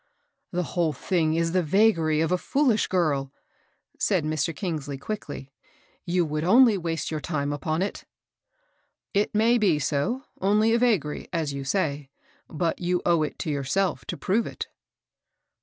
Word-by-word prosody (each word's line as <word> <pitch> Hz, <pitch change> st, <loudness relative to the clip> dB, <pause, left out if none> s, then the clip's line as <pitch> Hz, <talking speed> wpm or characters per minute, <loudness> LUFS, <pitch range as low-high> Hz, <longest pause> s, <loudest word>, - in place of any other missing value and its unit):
The 180 Hz, 0 st, -1 dB
whole 165 Hz, -1 st, 0 dB
thing 160 Hz, -3 st, 0 dB
is 165 Hz, 0 st, +1 dB
the 185 Hz, +1 st, +2 dB
vagary 165 Hz, -3 st, +3 dB
of 160 Hz, -, 0 dB
a 180 Hz, -, +3 dB
fool 280 Hz, +4 st, +2 dB
ish 215 Hz, -, +1 dB
girl," 145 Hz, -7 st, 0 dB, 0.7 s
said -, -, +1 dB
Mr. 155 Hz, 0 st, 0 dB
Kingsley, 150 Hz, -7 st, -4 dB
quickly. 145 Hz, -5 st, -6 dB, 0.5 s
..You 175 Hz, -1 st, +1 dB
would 155 Hz, 0 st, -2 dB
only 230 Hz, +5 st, +6 dB
waste 165 Hz, -5 st, -3 dB
your 155 Hz, -, -2 dB
time 145 Hz, -2 st, -2 dB
upon 155 Hz, +4 st, -1 dB
it." 200 Hz, -, -5 dB, 0.5 s
" -, -, -43 dB, 0.3 s
It 205 Hz, +1 st, +1 dB
may 230 Hz, +3 st, +4 dB
be 190 Hz, -8 st, +3 dB
so, 150 Hz, -, -1 dB
— -, -, -33 dB
only 210 Hz, +4 st, +3 dB
a 235 Hz, -, +3 dB
vagary, 205 Hz, -, +1 dB
as 160 Hz, -4 st, -1 dB
you 140 Hz, 0 st, -4 dB
say; 145 Hz, -3 st, -1 dB, 0.4 s
but 165 Hz, +1 st, -1 dB
you 180 Hz, 0 st, 0 dB
owe 170 Hz, -2 st, +3 dB
it 150 Hz, -, -2 dB
to 155 Hz, -, -1 dB
yourself 150 Hz, +7 st, 0 dB
to -, -, -5 dB
prove 220 Hz, +5 st, 0 dB
it." -, -, -6 dB
170 Hz, 170 wpm, -26 LUFS, 150-200 Hz, 0.7 s, only